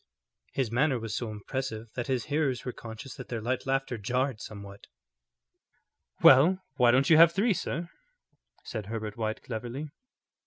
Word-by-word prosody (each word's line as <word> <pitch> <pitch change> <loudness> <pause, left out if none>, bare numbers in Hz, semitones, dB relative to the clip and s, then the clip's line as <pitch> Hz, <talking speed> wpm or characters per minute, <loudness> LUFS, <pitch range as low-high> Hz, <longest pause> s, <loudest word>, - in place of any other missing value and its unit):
His 130 -5 -1
manner 135 +2 +2
was 110 -1 -4
so 120 - -3
impressive 110 +1 -5
that 120 - -4
his 130 -4 0
hearers 145 -5 -1
were 125 - -2
conscious 115 +3 -9
that 130 - -8
their 120 - -3
light 125 +4 -2
laughter 135 -3 -1
jarred 125 +2 -1
somewhat. 100 -1 -10 1.4
"Well, 155 +9 +8 0.2
why 125 -2 +5
don't 135 +6 +4
you 155 - +8
have 165 +1 +8
three, 210 +4 +2
sir?" 170 -1 -3 0.8
said 110 -4 -6
Herbert 110 -1 -4
White, 110 -1 -3
cleverly. 125 +5 -5
125 Hz, 155 wpm, -29 LUFS, 110-135 Hz, 1.4 s, Well